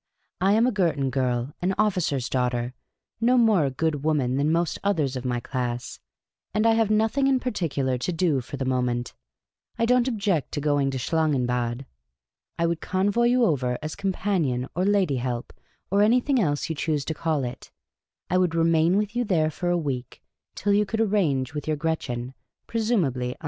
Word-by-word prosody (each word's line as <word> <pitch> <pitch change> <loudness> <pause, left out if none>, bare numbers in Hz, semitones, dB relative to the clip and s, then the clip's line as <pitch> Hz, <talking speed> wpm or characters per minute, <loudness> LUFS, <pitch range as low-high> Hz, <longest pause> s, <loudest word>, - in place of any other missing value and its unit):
" - - -48
I 195 +2 +4
am 225 +2 +4
a 255 - +2
Girton 165 - 0
girl, 125 +1 -1
an 185 +2 0
officer's 180 - +1
daughter, 125 -1 -1 0.5
no 245 +3 +3
more 220 -9 +4
a - - +1
good 145 +2 -2
woman 145 -5 +1
than 145 +2 +2
most 170 0 0
others 155 -10 0
of 130 0 -5
my 120 -1 0
class; 120 0 -4 0.6
and 215 +1 +2
I 230 - +6
have 225 -2 +2
nothing 220 +6 +2
in 265 -1 +3
particular 145 - -1
to 155 - -2
do 160 -5 +1
for 135 +3 -8
the 135 - -2
moment. 125 -2 -1 0.6
I 230 - +2
don't 250 +1 +3
object 200 - -1
to - - -1
going 145 -2 +1
to 135 - -3
Schlangenbad. 125 -4 0 0.7
I 170 - +1
would 170 -1 -1
convoy 200 +5 +1
you 245 0 +4
over, 125 - 0
as 155 - -4
companion, 180 -10 -1
or 180 +2 +1
lady 195 -9 +2
help, 120 -1 -4 0.4
or 200 +1 +3
anything 250 +5 +3
else 145 -5 0
you 165 - -2
choose 150 -2 -1
to 160 - -2
call 155 -3 -1
it; 125 0 -6 0.6
I 185 - +2
would 180 -3 +1
remain 165 +2 +3
with 210 +2 -1
you 245 - +1
there 165 -8 +1
for 175 +3 -3
a 175 - +2
week, 130 -6 -4 0.3
till 205 - +1
you 205 +1 +4
could 220 +2 -3
arrange 165 - +1
with 150 0 -5
your 155 -1 0
Gretchen, 135 -6 -3 0.3
presumably 170 - 0
un. - - -29
160 Hz, 190 wpm, -25 LUFS, 130-205 Hz, 0.7 s, I